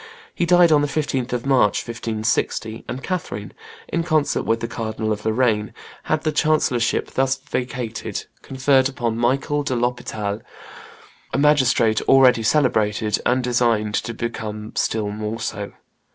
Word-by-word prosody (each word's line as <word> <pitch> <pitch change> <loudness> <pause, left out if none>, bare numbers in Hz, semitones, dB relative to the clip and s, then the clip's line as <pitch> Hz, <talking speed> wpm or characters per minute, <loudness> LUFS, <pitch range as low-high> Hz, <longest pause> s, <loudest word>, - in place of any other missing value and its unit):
He 175 - -1
died 175 -1 +6
on 150 -1 +5
the 145 - +1
15th 135 -4 -2
of 120 0 -2
March, 130 -7 +2
1560; 110 -1 -2
and 125 +3 -5
Catherine, 105 - -4 0.3
in 170 - -1
concert 155 -3 +1
with 115 0 0
the 115 - -3
Cardinal 110 -1 -3
of 105 0 -3
Lorraine, 110 -2 +1 0.3
had 155 0 0
the 155 - +1
chancellorship 150 -7 +1
thus 135 0 +1
vacated 125 -4 -4 0.2
conferred 135 0 +2
upon 120 -5 -2
Michael 135 +5 +1
de 140 -3 -2
l'Hospital, 110 -3 -2 0.9
a - - +1
magistrate 130 -6 +3
already 130 -3 +6
celebrated, 110 -5 +1
and 125 +1 +2
destined 115 -4 +1
to 115 +2 -2
become 110 -2 -5
still 105 -2 0
more 105 +2 -4
so. 105 -2 -4
120 Hz, 140 wpm, -21 LUFS, 110-135 Hz, 0.9 s, died